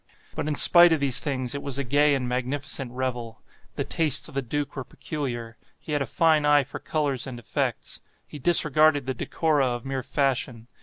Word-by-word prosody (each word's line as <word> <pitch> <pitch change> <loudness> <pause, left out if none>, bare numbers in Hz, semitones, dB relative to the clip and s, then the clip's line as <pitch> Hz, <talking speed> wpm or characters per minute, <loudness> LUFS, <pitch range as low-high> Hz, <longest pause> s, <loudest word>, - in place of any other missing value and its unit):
But, - - -4
in 150 - -1
spite 175 +3 +7
of 160 - 0
these 140 -3 +3
things, 130 -4 -3
it 140 - -5
was 140 -2 -4
a 140 - -2
gay 145 +3 +2
and 130 -2 -3
magnificent 130 +1 -3
revel. 125 -3 -5 0.4
The - - -2
tastes 155 -5 +2
of 155 - -12
the 135 - -2
duke 140 +3 -4
were 135 - -5
peculiar. 120 -6 -6 0.2
He - - -11
had 145 -1 -1
a 135 - -2
fine 160 +3 +2
eye 145 -1 +4
for 135 - -9
colors 140 -5 -2
and 130 -2 -7
effects. 120 - -3 0.2
He 150 - -11
disregarded 155 -2 +4
the 130 - -3
decora 145 +2 -1
of 120 - -9
mere 135 -1 -3
fashion. 125 -3 -2
140 Hz, 200 wpm, -24 LUFS, 125-150 Hz, 0.4 s, spite